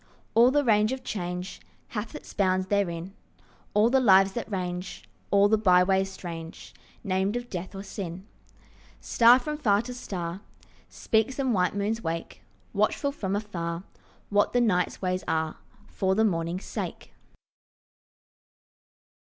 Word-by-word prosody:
All 235 +2 +6
the 290 +2 +2
range 215 -2 +3
of 260 -1 -4
change 180 -3 -5 0.3
Hath 215 0 -5
its - - -10
bounds 185 -2 +1
therein, 190 -2 -1 0.6
All 210 +2 +5
the 265 - +5
lives 195 -5 +6
that 235 +1 -5
range 180 -1 -4 0.2
All 200 0 +5
the 220 +1 +3
byways 190 0 +4
strange 165 -3 -8 0.3
Named 190 +2 0
of 245 0 -5
death 185 +1 -5
or 195 - -6
sin. 190 -2 -6 0.7
Star 235 +1 +6
from 300 +3 -4
far 210 -6 +3
to 250 +1 -6
star 185 -6 -5 0.5
Speaks, 220 +4 0
and 265 -3 +1
white 180 -1 +1
moons 210 +3 -1
wake, 165 +1 -4 0.3
Watchful 280 -2 +1
from 200 -9 -3
afar 175 -5 -4 0.5
What 205 0 +2
the 245 - +3
night's 180 -5 +1
ways 185 0 -1
are 160 -1 -1 0.3
For 190 -2 0
the 220 +2 +3
morning's 170 -1 -1
sake. - - -6
195 Hz, 140 wpm, -27 LUFS, 180-220 Hz, 0.7 s, All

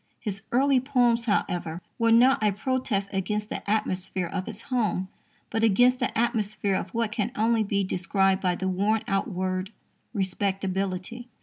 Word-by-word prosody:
His 200 -3 -4
early 270 +2 +4
poems, 245 -3 +2
however, 175 -6 -1 0.2
were 230 0 +3
not 255 +4 +5
a 210 -1 +3
protest 210 -2 -1
against 210 +2 -2
the - - -4
atmosphere 190 -3 -1
of 185 +2 -4
his 225 0 -7
home, 215 -8 -1 0.4
but 225 0 0
against 245 +4 +4
the - - -1
atmosphere 215 -4 0
of 190 - -2
what 225 +2 -1
can 220 0 -1
only 225 +1 +2
be 200 -1 0
described 190 +1 +1
by 180 -2 +1
the 190 - -3
worn 205 +4 +1
out 195 -3 0
word 185 0 -2 0.4
"respectability." 195 +2 -2
205 Hz, 160 wpm, -26 LUFS, 190-230 Hz, 0.4 s, not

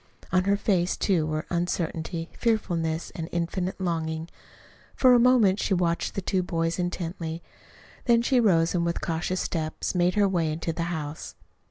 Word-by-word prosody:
On 185 0 +2
her 200 0 +3
face, 185 -4 +1
too, 170 -6 +1
were 155 0 -2
uncertainty, 170 -1 -2
fearfulness, 175 -8 -1
and 165 -1 -6
infinite 175 +2 -2
longing. 160 -2 -2 0.7
For 255 -1 +6
a 245 - +6
moment 235 -6 +4
she 195 - +1
watched 170 -1 0
the 195 - -3
two 185 0 +1
boys 165 -1 -1
intently. 170 -2 -3 0.6
Then 235 -1 +4
she 255 +1 +3
rose 170 -8 +3
and 175 -2 +1
with 170 0 -1
cautious 170 +3 -1
steps 155 -2 -2
made 180 +1 +2
her 205 -1 +4
way 170 -5 0
into 165 +1 -3
the 165 +1 -2
house. 155 -2 -5
175 Hz, 165 wpm, -26 LUFS, 165-190 Hz, 0.7 s, For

